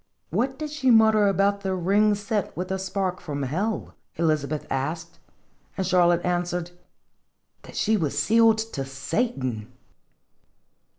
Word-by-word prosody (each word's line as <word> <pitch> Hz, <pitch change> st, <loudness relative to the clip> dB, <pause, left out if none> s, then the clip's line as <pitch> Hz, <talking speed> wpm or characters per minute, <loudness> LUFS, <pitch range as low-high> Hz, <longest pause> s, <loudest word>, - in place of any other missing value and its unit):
"What 255 Hz, -, 0 dB
did 305 Hz, 0 st, -5 dB
she 285 Hz, -4 st, 0 dB
mutter 220 Hz, -2 st, +5 dB
about 200 Hz, +1 st, +1 dB
a 190 Hz, -1 st, -1 dB
ring 205 Hz, +4 st, +3 dB
set 205 Hz, -2 st, -3 dB
with 185 Hz, +2 st, -3 dB
a 190 Hz, -, -1 dB
spark 190 Hz, -1 st, -2 dB
from 145 Hz, -5 st, -4 dB
hell? 190 Hz, -, -2 dB
" -, -, -47 dB
Elizabeth 155 Hz, -2 st, 0 dB
asked. 165 Hz, +5 st, -3 dB, 0.6 s
And 190 Hz, -, -1 dB
Charlotte 175 Hz, -1 st, +3 dB
answered: 175 Hz, -1 st, -1 dB, 0.5 s
" -, -, -49 dB
That -, -, -13 dB
she 220 Hz, 0 st, +2 dB
was 150 Hz, -6 st, -2 dB
sealed 225 Hz, +7 st, +4 dB, 0.2 s
to 135 Hz, -, -2 dB
Satan 135 Hz, -, -3 dB
185 Hz, 140 wpm, -25 LUFS, 160-210 Hz, 0.6 s, mutter